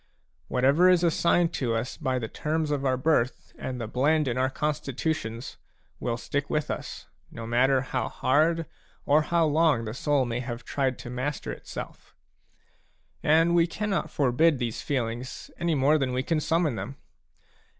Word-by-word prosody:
Whatever 140 +8 +4
is 180 -1 +4
assigned 170 0 +2
to 120 -4 -1
us 115 +3 -3
by 130 -1 -1
the 115 -3 -3
terms 155 +4 -2
of 140 -2 -1
our 130 -2 +1
birth 130 -3 0
and 130 -1 -5
the 115 - -3
blend 145 +6 +2
in 120 - 0
our 130 +1 +1
constitutions, 140 -4 -3 0.4
will 120 -1 -2
stick 145 +3 -3
with 150 -1 -1
us, - - -6 0.2
no 115 - -8
matter 130 +3 +3
how 125 -2 -2
hard 160 +4 +2 0.4
or 150 +2 +4
how 170 +1 +2
long 150 -6 +3
the 110 - -4
soul 140 +1 +1
may 120 0 -2
have 120 -2 -6
tried 135 -2 -1
to 120 - -8
master 130 +3 -3
itself. - - -9 1.1
And 165 +3 +4
we 170 0 +4
cannot 210 +3 -2
forbid 145 +3 +3
these 120 -3 -3
feelings 125 -1 -3
any 170 -2 +1
more 145 +3 +3
than 130 -2 -1
we 130 +1 0
can 165 +1 0
summon 160 -1 +1
them. 125 +4 -5
135 Hz, 165 wpm, -27 LUFS, 125-160 Hz, 1.1 s, Whatever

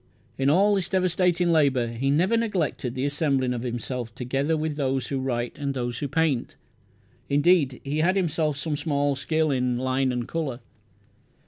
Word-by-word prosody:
In 135 +1 +1
all 195 +7 +4
this 190 -4 -1
devastating 180 -2 +2
labour 135 -7 +3
he 120 +4 -2
never 175 +10 +3
neglected 180 - -1
the 130 +1 -1
assembling 140 -3 0
of 120 - -4
himself 120 -1 -4
together 135 +5 -1
with 155 -1 -2
those 135 -2 -1
who 135 - -1
write 120 -1 -3
and 140 -1 -2
those 120 -2 -3
who 145 - -2
paint. 140 -3 0 0.7
Indeed, 145 -2 +3
he 145 +2 -2
had 180 +4 +3
himself 160 -5 0
some 150 +2 -2
small 145 -2 0
skill 155 +2 0
in 125 -2 0
line 130 +1 0
and 125 -1 -3
colour. 140 -7 -3
140 Hz, 165 wpm, -25 LUFS, 130-160 Hz, 0.7 s, all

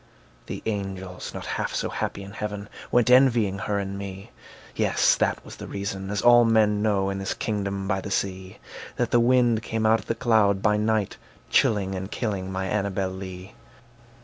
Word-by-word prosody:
The - - -6
angels, 95 -3 -4
not - - -7
half - - -3
so - - -2
happy 100 - -3
in 100 - -10
heaven, 105 0 -5 0.2
Went 120 0 +3
envying 120 -7 +4
her 100 +1 -1
and 100 0 -4
me; 95 -1 -8 0.4
Yes, - - +3
that - - 0
was - - -10
the - - -8
reason 100 -1 -4
(as 105 -1 -2
all 120 0 +7
men 110 -2 +3
know, 100 -2 +1
In 95 - -4
this 95 - -3
kingdom 100 -2 -3
by 95 -1 0
the 100 - -6
sea) 95 -1 -3 0.4
That 120 -2 -1
the 120 - +5
wind 120 -2 +3
came 110 0 -2
out 110 +1 +4
of - - -13
the 115 - -1
cloud 110 -5 +3
by 105 -1 +3
night, 105 -1 0 0.3
Chilling 100 -3 +2
and 95 +1 -4
killing 100 -5 -3
my 95 0 -2
Annabel 100 -1 -1
Lee. 95 0 -8
100 Hz, 185 wpm, -25 LUFS, 95-110 Hz, 0.4 s, all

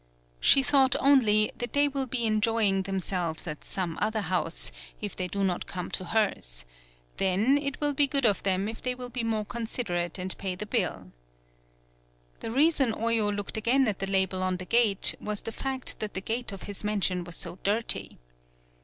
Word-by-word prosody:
She 275 - +6
thought 265 -1 +4
only 220 -7 +4
that 240 -1 -4
they 285 0 +4
will 275 -2 -2
be 240 -1 0
enjoying 215 -2 +2
themselves 185 -4 -2
at 155 -3 -6
some 180 -4 -3
other 220 +1 0
house, 175 - -2 0.3
if - - -5
they 185 - -2
do 200 +3 -2
not 180 -2 -1
come 180 -1 -5
to 185 - -3
hers, - - -1 0.5
then, 195 +8 +2
it 280 -2 -2
will 290 -1 +2
be 285 +1 +3
good 275 -1 +2
of 205 -3 +3
them 195 +1 0
if 220 +1 -6
they 250 0 -2
will 250 -1 -7
be 245 -1 -3
more 220 -2 -1
considerate 205 -7 -3
and 185 0 -1
pay 190 -2 -2
the 210 - -5
bill. 180 - -2 1.3
The - - -5
reason 275 -1 +3
Oyo 230 -2 +1
looked 205 +1 -3
again 245 +4 +3
at 205 -3 -1
the 195 - -2
label 190 -1 +1
on 185 0 0
the 185 - -7
gate 220 -2 +4
was 210 -1 -3
the 225 - -5
fact 265 +2 -3
that 215 -1 -4
the - - 0
gate 230 +3 -3
of 195 - -8
his 205 0 -4
mansion 195 -4 0
was 175 -1 -7
so 175 0 -5
dirty. 215 +3 0
210 Hz, 190 wpm, -28 LUFS, 185-240 Hz, 1.3 s, She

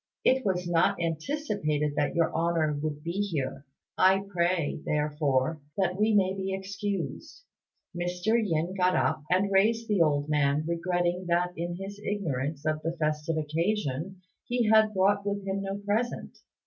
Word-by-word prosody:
It 260 0 +4
was 180 -4 -1
not 170 -1 +2
anticipated 165 - -1
that - - 0
Your 165 -1 +2
Honour 165 -2 +1
would 150 -1 -4
be 170 - -2
here. 145 -7 -3 0.3
I 190 +1 +5
pray, 175 -5 0
therefore, 150 -1 0 0.2
that 185 -2 +1
we 215 +3 +2
may 190 -2 +3
be 190 0 -2
excused." 195 -5 -5 0.5
Mr. 175 +2 -2
Yin 170 -2 -1
got 185 -1 +2
up 155 -1 +1
and 190 +2 +2
raised 225 +4 +3
the 205 -4 +2
old 145 -2 +2
man, 150 0 +1
regretting 175 +1 -1
that, 175 +1 +1
in 175 +1 -3
his 200 +1 -7
ignorance 150 -7 -2
of 155 0 0
the 165 +2 -3
festive 155 +1 -1
occasion, 165 +2 -2 0.2
he 240 -2 +1
had 220 0 +5
brought 200 +2 +3
with 200 -1 -3
him 195 0 -2
no 195 0 -3
present. 205 +4 -2
175 Hz, 155 wpm, -28 LUFS, 155-195 Hz, 0.5 s, I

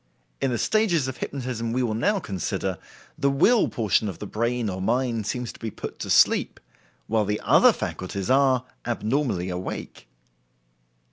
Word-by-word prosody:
In 135 - +1
the 120 - -1
stages 175 - +2
of 130 -1 -5
hypnotism 120 -4 -4
we 130 +1 +1
will 115 -3 0
now 200 - +1
consider, 95 - -3 0.4
the 140 -2 +3
will 200 - +4
portion 110 -3 +1
of 90 - -7
the - - -7
brain 115 +3 -1
or 95 -1 -3
mind 115 0 0
seems 125 -2 -3
to - - -16
be 115 - -4
put - - -8
to - - -5
sleep, - - +4 0.5
while 110 0 +1
the 105 +1 -1
other - - +6
faculties 95 +1 -4
are, 130 -1 +3 0.2
abnormally 115 -5 -1
awake. 90 +1 -6
120 Hz, 160 wpm, -25 LUFS, 105-130 Hz, 0.5 s, other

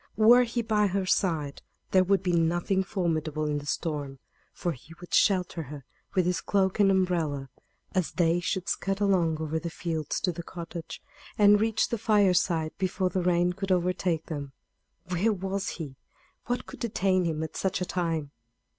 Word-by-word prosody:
Were 240 +3 +7
he 235 0 -2
by 210 -2 +2
her 195 0 -1
side 160 -7 0 0.3
there 185 -1 +5
would 195 0 +2
be 180 -2 0
nothing 175 +3 +1
formidable 160 -5 -1
in 150 -1 0
the 145 - -10
storm, 145 -4 -3 0.3
for 175 - -2
he 155 +3 -11
would 175 - -11
shelter 180 -4 +3
her 145 -2 -9 0.3
with 185 -2 +3
his 180 -1 0
cloak 190 0 +1
and 200 -1 +5
umbrella, 170 -8 0 0.4
as 185 -3 -1
they 170 -1 +2
should 185 +1 -2
scud 195 0 -1
along 180 -6 +2
over 160 0 -2
the 170 - -4
fields 160 -2 -3
to 180 - +1
the 170 0 -6
cottage, 170 -1 -8 0.3
and 205 0 +6
reach 225 0 +1
the 235 - -2
fireside 180 -7 +2
before 185 0 0
the 185 - 0
rain 175 0 +2
could 195 +1 -4
overtake 180 -2 +1
them. 140 -4 -6 0.6
Where 180 +5 +2
was 195 0 -2
he? 145 -6 -7 0.5
What 245 0 -1
could - - -11
detain 190 -5 +1
him 160 -1 -1
at 160 - -6
such 190 - -1
a 180 - -1
time? 165 -5 -2
180 Hz, 175 wpm, -28 LUFS, 160-195 Hz, 0.6 s, Were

